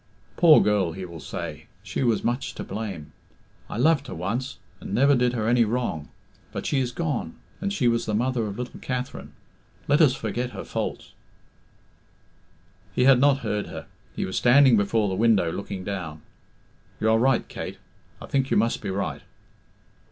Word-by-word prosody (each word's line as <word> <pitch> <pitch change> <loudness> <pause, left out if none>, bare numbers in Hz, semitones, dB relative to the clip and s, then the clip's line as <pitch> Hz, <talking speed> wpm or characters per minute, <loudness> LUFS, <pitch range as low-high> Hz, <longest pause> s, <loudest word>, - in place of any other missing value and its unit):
'Poor 165 -3 +7
girl,' 100 -5 +2
he 95 +2 -6
will 85 -2 -9
say, 80 -1 -6 0.2
'she 100 - -4
was 115 -5 +1
much 120 +3 -2
to - - -5
blame. 100 -9 -6 0.6
I - - -5
loved 140 +2 +3
her - - -6
once, 115 +9 -3 0.2
and 100 - -5
never 140 +3 +5
did 125 -2 +2
her 110 -3 -1
any 120 0 +4
wrong. 115 -9 -2 0.4
But - - -5
she 140 - +1
is 125 -2 -1
gone, 145 - -3 0.3
and 200 +1 -1
she 150 -11 +1
was 115 0 +1
the 105 - 0
mother 120 0 0
of 100 0 -6
little 125 0 -6
Katherine 125 -1 -5 0.6
let 145 +3 +4
us 135 -4 +5
forget 120 +2 -3
her - - -4
faults' - - -4 0.9
" 90 +3 -34
He - - +3
had 130 -1 +6
not 140 0 +4
heard 105 -1 -1
her; - - -8 0.3
he - - -1
was 95 - -3
standing 130 0 +6
before 105 +1 +2
the 95 - -2
window 100 -4 +3
looking 100 0 -5
down. 85 -6 -5 0.8
"You 110 0 +2
are 110 - +4
right, 130 0 +2
Kate, - - -6 0.4
I - - -8
think 135 -1 0
you - - +2
must 115 +3 +1
be 105 - -4
right." 100 +1 -3
115 Hz, 180 wpm, -25 LUFS, 95-130 Hz, 0.9 s, Poor